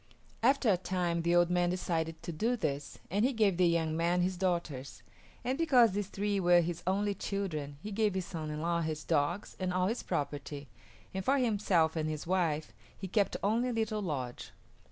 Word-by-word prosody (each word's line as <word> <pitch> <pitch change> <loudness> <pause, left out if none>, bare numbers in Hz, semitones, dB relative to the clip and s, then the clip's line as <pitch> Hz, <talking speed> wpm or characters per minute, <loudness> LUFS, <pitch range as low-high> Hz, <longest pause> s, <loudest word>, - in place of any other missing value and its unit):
After 265 +2 +3
a 185 - +3
time 175 -2 -1
the 170 +1 +2
old 175 0 +4
man 175 0 +2
decided 165 -3 -2
to - - -4
do 225 +10 0
this, 140 -10 -3
and 205 +3 +2
he 265 +3 +2
gave 210 -6 +2
the 180 -1 +4
young 165 -2 +1
man 170 +2 +2
his 185 +1 0
daughters; 170 -7 -2 0.4
and 260 +4 -1
because 255 -9 +5
these 200 0 -2
three 205 0 -1
were 175 -1 +5
his 170 0 -3
only 200 +2 +1
children 165 -8 -3
he 215 - -5
gave 210 -1 +1
his 190 -2 -1
son 160 -4 -5
in 150 0 -4
law 170 +1 0
his 155 -2 -3
dogs 165 +4 0
and 185 -1 -1
all 180 0 +1
his 225 +6 -1
property, 145 0 -4 0.5
and 190 0 -3
for 275 +6 +3
himself 200 -10 +2
and 155 -1 -1
his 155 -1 -4
wife 165 -4 0 0.2
he 190 - -5
kept 200 +2 +1
only 230 +5 +2
a - - -2
little 220 -1 -1
lodge. 135 -9 -4
180 Hz, 200 wpm, -32 LUFS, 160-205 Hz, 0.5 s, because